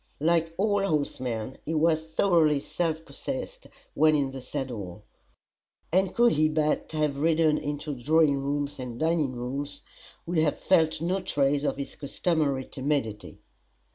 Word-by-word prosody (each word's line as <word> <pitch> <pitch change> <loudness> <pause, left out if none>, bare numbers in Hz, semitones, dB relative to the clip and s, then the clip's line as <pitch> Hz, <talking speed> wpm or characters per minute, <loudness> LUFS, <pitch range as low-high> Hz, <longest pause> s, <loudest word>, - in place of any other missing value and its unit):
Like 165 +1 +1
all 205 0 +2
horsemen, 130 - -2
he 160 - -3
was 160 0 +2
thoroughly 160 -3 +3
self 160 +1 -2
possessed 275 - -6 0.3
when 155 0 +4
in 140 -2 0
the 135 -1 -7
saddle; 115 -9 -5 0.9
and 185 +2 +2
could 240 0 +5
he 155 +1 +3
but 155 -1 0
have 150 -2 0
ridden 160 0 +3
into 145 +1 -4
drawing 145 +3 +3
rooms 140 +1 -2
and 125 -2 -6
dining 160 -4 +1
rooms, 140 +4 -5 0.4
would 170 -1 0
have 155 -2 +2
felt 160 -3 +2
no 185 +3 0
trace 145 -4 +1
of 145 - 0
his 140 - -5
customary 145 -2 -1
timidity. 130 -7 -3
150 Hz, 140 wpm, -27 LUFS, 140-165 Hz, 0.9 s, could